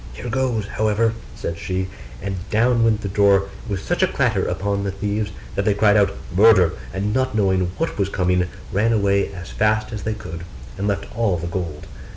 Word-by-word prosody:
'Here 120 - -6
goes, 120 -4 0
however,' 110 +2 +1 0.2
said 85 - -4
she: 95 0 -2 0.4
and 100 0 -2
down 115 +2 +3
went 110 -2 +2
the 100 - -3
door 100 0 +3 0.2
with 100 -3 -2
such - - 0
a - - +5
clatter - - +1
upon 100 0 -1
the 100 - -1
thieves, 105 +2 -2 0.2
that 100 - 0
they 105 -1 +2
cried 105 0 +4
out 100 -2 +3 0.2
'Murder!' 95 -4 +6 0.2
and 100 +2 -1
not 130 -1 0
knowing 95 -4 +2
what 165 -8 -2
was 100 -1 +1
coming, 90 -1 +1 0.2
ran 110 +4 +2
away 100 -2 +2
as 90 -3 -8
fast 110 +1 +1
as 105 - -4
they 110 0 -2
could, 85 -5 -7 0.3
and 100 +2 -2
left 100 -1 -1
all 110 -6 +1
the 85 - -5
gold. 85 -3 -4
100 Hz, 195 wpm, -22 LUFS, 95-110 Hz, 0.4 s, Murder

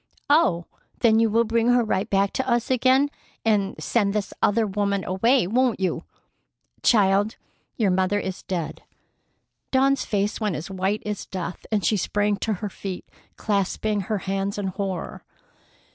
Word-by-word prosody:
"Oh! 185 - +3 0.4
Then 225 -2 +5
you 225 -1 +3
will 230 +2 +3
bring 230 +1 +1
her 245 0 +4
right 210 -1 -1
back 195 0 +2
to 265 - -2
us 240 +1 +1
again 260 +3 +3 0.3
and 205 -3 +2
send 205 -4 +1
this 205 -1 -2
other 220 +2 +3
woman 200 -1 -1
away, 230 +6 +2
won't 240 +4 +1
you?" 190 -1 -1 0.8
"Child, 205 -1 +3 0.4
your 210 -5 +2
mother 190 +2 +1
is 190 -2 -5
dead!" 175 -4 -4 0.9
Dawn's 275 +1 +3
face 205 +2 -1
went 210 -5 0
as 160 +5 -6
white 190 +3 -1
as 210 -1 -4
death, 180 -2 -6
and 205 -5 +1
she 210 - +3
sprang 205 +2 0
to 220 - -1
her - - -2
feet, 190 -1 -6 0.3
clasping 205 0 0
her 210 +3 -2
hands 195 +1 -2
in 200 -2 -2
horror. 190 -2 -4
205 Hz, 160 wpm, -24 LUFS, 195-230 Hz, 0.9 s, Then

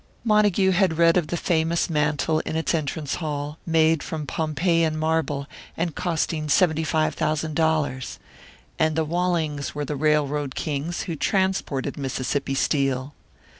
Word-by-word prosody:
Montague 210 -4 +3
had 180 -3 +2
read 165 0 +5
of 175 -4 +1
the 175 - -2
famous 165 0 +1
mantel 155 0 +1
in 160 - -4
its 160 +2 0
entrance 150 -2 -2
hall, 150 0 -4
made 160 -1 +3
from 155 -2 -5
Pompeiian 160 +2 0
marble, 155 -3 0 0.3
and 170 -1 -1
costing 160 -2 -1
seventy 160 -1 +3
five 155 0 +1
thousand 155 0 -1
dollars. 155 -5 0 0.6
And 160 -1 +2
the 160 0 +1
Wallings 160 -4 -1
were 145 0 -2
the 150 - -3
railroad 145 -2 +1
kings 155 +3 -3
who 170 - -4
transported 190 -7 -1
Mississippi 135 +1 -2
Steel! 135 -1 0
155 Hz, 140 wpm, -24 LUFS, 145-165 Hz, 0.6 s, read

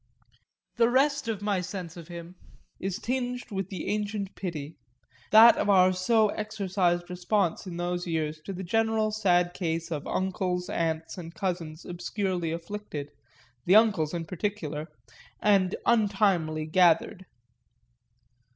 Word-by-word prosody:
The 235 0 +4
rest 275 +1 +2
of 210 -3 -3
my 200 -3 0
sense 180 -2 -6
of 170 -2 -10
him 170 0 -9 0.5
is 190 -1 -3
tinged 250 -1 -3
with 195 -2 -3
the 185 -5 -5
ancient 205 -1 -2
pity 160 -5 -5 0.5
that 225 +2 +9
of - - 0
our 185 -1 +5
so 215 +4 +3
exercised 190 -5 -1
response 180 0 -1
in 175 -2 -6
those 175 0 -2
years 155 -2 -2
to 195 - -4
the 190 +1 -6
general 220 +2 +1
sad 180 -5 +2
case 165 -2 -3
of 150 -3 -4
uncles, 180 -1 -1
aunts 160 +2 -2
and 165 -1 -9
cousins 170 -4 -4
obscurely 175 -1 -2
afflicted 170 -4 -6 0.6
(the 185 - +6
uncles 200 -9 +4
in 165 -1 -3
particular) 160 -4 -4 0.5
and 195 -3 +3
untimely 195 -8 +2
gathered. 180 +2 +2
185 Hz, 135 wpm, -28 LUFS, 170-210 Hz, 0.6 s, that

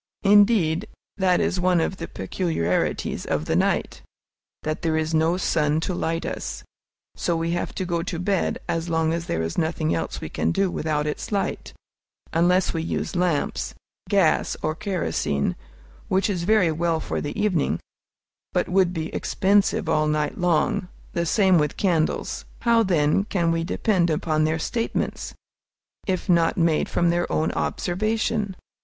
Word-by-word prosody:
Indeed, 205 -3 +4 0.3
that 185 -2 +3
is 185 - 0
one 180 -1 +3
of 185 +3 -1
the - - -5
peculiarities 125 - -1
of 75 0 -1
the - - 0
night, - - 0 0.6
that 155 0 -2
there 160 -2 +1
is 160 +1 -1
no 160 +2 +2
sun 155 -4 +1
to 185 - -2
light 165 -1 -2
us, - - -5 0.5
so 170 - 0
we 165 +1 -1
have 175 - -2
to 185 - -2
go 170 -1 -1
to 170 0 -4
bed 190 +2 0
as 165 +1 -2
long 160 -1 +1
as 170 0 -3
there 80 - -1
is 80 - -2
nothing 160 -1 0
else 80 -1 -3
we - - -5
can 80 - -1
do 195 - +1
without 150 -2 -1
its 150 - -4
light, 200 -2 -2 0.6
unless 180 +3 +3
we 165 - -1
use 165 - -3
lamps, 175 -4 0 0.3
gas, 195 -6 +2
or 155 - +1
kerosene, 170 - -1 0.5
which 190 +3 +1
is 175 -3 -2
very 210 -5 +4
well 165 +1 0
for - - -3
the 145 +8 -4
evening, 190 -8 +1 0.7
but - - +1
would 185 -1 +2
be 160 -2 -4
expensive 200 +1 +2
all 155 0 +2
night 150 -1 0
long; 175 0 +1 0.3
the 170 -1 -1
same 190 -2 +4
with 150 -1 -1
candles. 170 -5 0 0.2
How, 235 -1 +4
then, 175 -2 +2
can 175 -6 0
we 165 0 0
depend 180 0 +1
upon 155 0 +1
their 155 +1 +1
statements, 230 +8 -2 0.7
if 185 -2 -1
not 170 -2 +3
made 165 -3 +2
from 170 -1 +2
their 175 0 -1
own 160 - +1
observation? 215 +1 -1
170 Hz, 160 wpm, -24 LUFS, 160-190 Hz, 0.7 s, Indeed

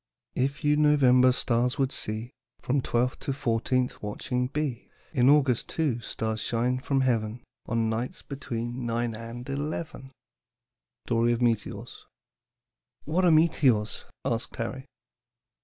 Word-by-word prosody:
"'If 140 +3 -1
you 150 0 +3
November's 130 -4 +5
stars 120 +1 +1
would 135 -1 +1
see, 110 +3 -4 0.3
From 135 +2 0
twelfth 125 +1 0
to 135 - -2
fourteenth 125 0 0
watching 125 +4 -2
be, 140 -3 -3 0.2
In 130 -3 +4
August 140 -5 +3
too 145 -8 0
stars 110 -1 -3
shine 125 +3 0
from 135 0 0
heaven, 115 -2 0 0.2
On 115 -1 +1
nights 115 +3 -3
between 120 -3 -4
nine 115 0 -1
and 115 +2 -7
eleven.'" 140 -1 -4 0.9
STORY 115 0 +2
OF 120 +1 -1
METEORS. 115 -3 -2 1.0
"What 175 +5 +1
are - - +6
meteors?" 140 -9 +3 0.2
asked 115 -3 -2
Harry. 130 +3 -4
125 Hz, 125 wpm, -27 LUFS, 115-140 Hz, 1.0 s, are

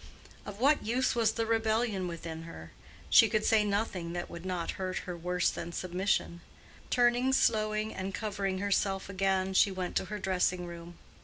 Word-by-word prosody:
Of 205 0 -8
what 285 +4 +3
use 245 +4 +1
was 225 -3 +2
the 230 0 -1
rebellion 220 -3 0
within 165 -1 -6
her? 80 - -10 0.4
She - - +7
could 215 -1 0
say 220 -1 +4
nothing 200 -5 -2
that 175 0 -5
would 170 +2 -7
not 180 -2 -2
hurt 185 -1 -2
her 180 - -5
worse 180 +1 0
than 170 - -6
submission. 180 -1 -1 0.5
Turning 245 +1 +3
slowly 215 -3 +1
and 190 0 -4
covering 200 -2 -2
herself 195 0 0
again, 190 -1 0
she 195 - +5
went 185 -2 -4
to - - 0
her 210 +3 -5
dressing 180 -2 0
room. 170 0 -9
195 Hz, 170 wpm, -30 LUFS, 180-215 Hz, 0.5 s, She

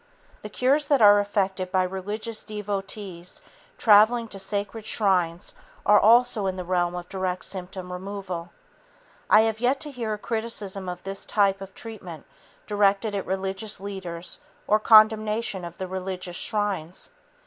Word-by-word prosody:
The 210 - -7
cures 270 +7 +2
that 285 -2 +3
are 205 -2 +7
effected 195 -2 -1
by 185 -1 +3
religious 205 +4 -4
devotees 200 -3 -5 0.4
traveling 225 +2 +5
to 195 - -5
sacred 205 +3 -2
shrines 180 -6 +1 0.3
are 210 0 +6
also 230 -2 +4
in 190 - -2
the 185 - -5
realm 175 -1 0
of 175 0 -6
direct 185 -1 -3
symptom 185 -1 -4
removal. 185 -2 -6 0.8
I 215 - +7
have 220 0 0
yet 255 +3 +1
to 300 - -5
hear 235 -5 -4
a - - -3
criticism 210 -4 -2
of 180 0 -7
this 195 0 -3
type 195 -2 +1
of 195 0 -10
treatment 185 -9 -8 0.4
directed 205 +1 +1
at 200 - -3
religious 195 +2 -3
leaders 185 -3 -7 0.3
or 215 - +3
condemnation 215 -2 +4
of 170 0 -8
the 190 - -4
religious 185 -1 -5
shrines. 195 -5 -2
200 Hz, 150 wpm, -25 LUFS, 185-215 Hz, 0.8 s, are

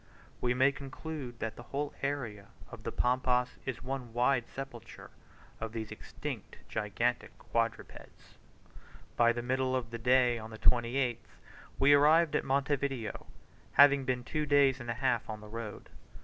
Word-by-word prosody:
We 125 0 +1
may 130 +2 +5
conclude 140 -2 -7
that 115 -1 -4
the - - -8
whole 145 +1 -2
area 120 -8 -3 0.2
of - - -9
the - - -4
Pampas 125 0 +1
is 130 -2 -4
one 125 -3 -5
wide 125 0 +2
sepulchre 130 -4 -9 0.5
of 110 0 -5
these 110 -2 -5
extinct - - -7
gigantic 115 +4 -1
quadrupeds. 115 -1 -4 0.8
By 120 0 +5
the 120 0 -3
middle 130 +1 0
of 120 -3 -3
the 115 - -5
day, 125 0 +4
on 110 0 -8
the 110 - -9
28th, 120 +1 +1 0.4
we 140 +2 +6
arrived 155 +2 +5
at - - +2
Monte 140 +1 +1
Video, 130 -6 -4 0.5
having 140 0 +7
been 125 -1 -1
two 150 +4 -2
days 140 -2 +4
and 120 -1 -7
a 115 - -1
half 125 -3 0
on 110 -1 -4
the 105 - -11
road. 110 -1 -7
125 Hz, 160 wpm, -31 LUFS, 115-135 Hz, 0.8 s, having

